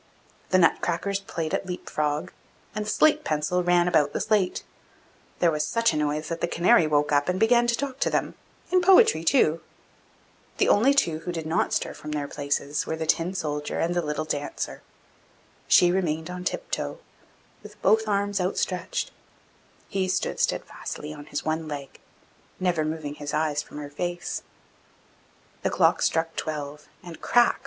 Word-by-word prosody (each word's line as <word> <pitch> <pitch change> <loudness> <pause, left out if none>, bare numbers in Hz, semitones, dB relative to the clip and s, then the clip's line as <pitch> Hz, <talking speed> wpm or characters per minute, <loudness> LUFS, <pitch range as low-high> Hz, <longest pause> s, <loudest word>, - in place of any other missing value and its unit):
The 185 - +4
nut 170 -3 +5
crackers 195 +3 -1
played 165 -5 -4
at 190 - -1
leap 180 -1 -6
frog, 150 0 -1 0.4
and 215 - -2
the - - -4
slate 305 +6 +3
pencil 155 +4 0
ran 175 0 +3
about 145 -5 +3
the - - -1
slate; 205 -4 +1 0.7
there 170 -2 +3
was 150 -1 0
such 230 +9 +1
a - - -2
noise 150 +1 -1
that 165 0 -4
the - - +1
canary 175 +1 +4
woke 150 -1 +2
up 145 +3 +2
and 180 +1 0
began 240 +2 +4
to 240 - +2
talk 270 0 -4
to - - +2
them, - - -1 0.4
in 365 0 +4
poetry 355 - +6
too! 165 - +3 1.0
The - - +3
only 260 +7 +5
two 165 - +2
who 170 +2 -5
did 165 -2 -5
not 160 +2 0
stir - - -1
from 150 0 -7
their 145 -1 -2
places 145 0 -2
were 160 - -1
the 160 0 -3
Tin 170 +4 +1
soldier 150 -4 -3
and 170 +1 +1
the 175 - +1
little 155 0 -3
Dancer. 145 -2 -4 0.9
She 175 -1 +6
remained 165 -2 -1
on 180 0 -6
tip - - -3
toe, - - -2 0.6
with - - -13
both 220 +1 +4
arms 200 -1 0
outstretched; 185 - -2 0.8
he 190 -1 -1
stood 185 0 -1
steadfastly 150 +1 -3
on 145 -1 -11
his 145 - -4
one 160 0 -1
leg, 145 -2 -7 0.6
never 180 -4 +1
moving 155 -1 -4
his 145 0 -5
eyes 150 -1 0
from - - -12
her 145 -1 -7
face. 175 +3 -3 1.2
The - - 0
clock - - +3
struck 165 0 +1
twelve, 150 -1 -5 0.2
and 175 -2 -10
crack! 240 0 +3
165 Hz, 175 wpm, -26 LUFS, 150-190 Hz, 1.2 s, poetry